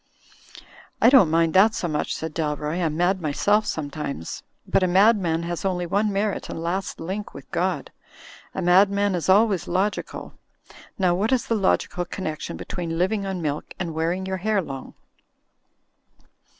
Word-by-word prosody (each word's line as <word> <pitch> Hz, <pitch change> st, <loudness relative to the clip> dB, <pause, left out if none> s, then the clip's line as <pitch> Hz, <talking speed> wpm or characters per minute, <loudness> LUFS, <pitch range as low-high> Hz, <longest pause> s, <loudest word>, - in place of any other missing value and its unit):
"I 235 Hz, -, +6 dB
don't 250 Hz, -, +7 dB
mind 165 Hz, 0 st, +2 dB
that 210 Hz, +4 st, +5 dB
so 175 Hz, -, -2 dB
much," 150 Hz, -2 st, -2 dB
said 160 Hz, -1 st, -5 dB
Dalroy, 150 Hz, +2 st, -2 dB
"I'm 155 Hz, -2 st, -1 dB
mad 180 Hz, +2 st, +1 dB
myself 205 Hz, +8 st, +1 dB
sometimes. 145 Hz, -, -4 dB, 0.2 s
But -, -, +2 dB
a 185 Hz, -, +3 dB
madman 185 Hz, -3 st, +3 dB
has 170 Hz, 0 st, -4 dB
only 180 Hz, -2 st, -1 dB
one 205 Hz, +4 st, +1 dB
merit 200 Hz, +1 st, -1 dB
and -, -, -5 dB
last 175 Hz, +3 st, -3 dB
link 190 Hz, +5 st, -5 dB
with 135 Hz, -1 st, -11 dB
God. 175 Hz, -5 st, -1 dB, 0.6 s
A -, -, -2 dB
madman 200 Hz, +3 st, +4 dB
is 175 Hz, 0 st, -2 dB
always 200 Hz, -2 st, +4 dB
logical. 195 Hz, +3 st, -2 dB, 0.6 s
Now 185 Hz, -2 st, +2 dB
what 205 Hz, +7 st, 0 dB
is 255 Hz, -3 st, +2 dB
the -, -, -1 dB
logical 190 Hz, -3 st, 0 dB
connection 160 Hz, -4 st, -5 dB
between 165 Hz, -2 st, -4 dB
living 195 Hz, +3 st, 0 dB
on 185 Hz, -3 st, -3 dB
milk 150 Hz, -1 st, -3 dB
and 170 Hz, -3 st, -4 dB
wearing 170 Hz, +4 st, -1 dB
your 190 Hz, 0 st, -2 dB
hair 210 Hz, +2 st, +1 dB
long? 135 Hz, -7 st, -6 dB
180 Hz, 160 wpm, -24 LUFS, 165-200 Hz, 0.6 s, don't